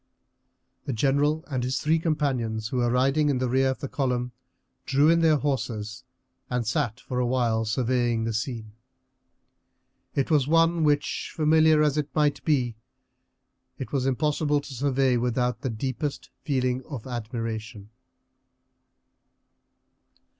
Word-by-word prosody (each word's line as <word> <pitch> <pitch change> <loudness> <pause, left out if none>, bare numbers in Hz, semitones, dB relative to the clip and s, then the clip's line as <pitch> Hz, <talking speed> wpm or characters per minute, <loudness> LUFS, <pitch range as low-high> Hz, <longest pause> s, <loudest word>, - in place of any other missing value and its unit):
The 135 - -2
general 145 +6 +1
and 130 -4 -2
his 130 +3 -1
three 160 +1 +2
companions, 125 -9 -1
who 130 - -3
were 120 -1 +2
riding 135 +5 +2
in 140 - +1
the 130 0 0
rear 130 +2 +2
of 130 - -3
the 140 - -3
column, 125 -3 -1 0.6
drew 145 +3 +4
in 170 - +4
their 160 -2 +5
horses 115 -7 -3 0.5
and 125 -2 -1
sat 120 -1 -1
for 125 0 -4
a 125 - +1
while 120 -3 +1
surveying 120 0 0
the 115 0 -2
scene. 115 -1 -4 1.4
It 140 +3 0
was 145 -4 +3
one 165 +1 +3
which, 145 -1 0
familiar 155 0 +4
as 150 0 +2
it 150 0 -3
might 150 -2 +1
be, 125 -7 +1 1.0
it 130 - -6
was 135 -2 0
impossible 150 +2 +1
to 140 - -10
survey 135 -1 +1
without 125 +1 -1
the 130 - -2
deepest 130 +5 -4
feeling 130 -2 0
of 135 -7 -6
admiration. 115 -3 -5
130 Hz, 140 wpm, -26 LUFS, 120-145 Hz, 1.4 s, their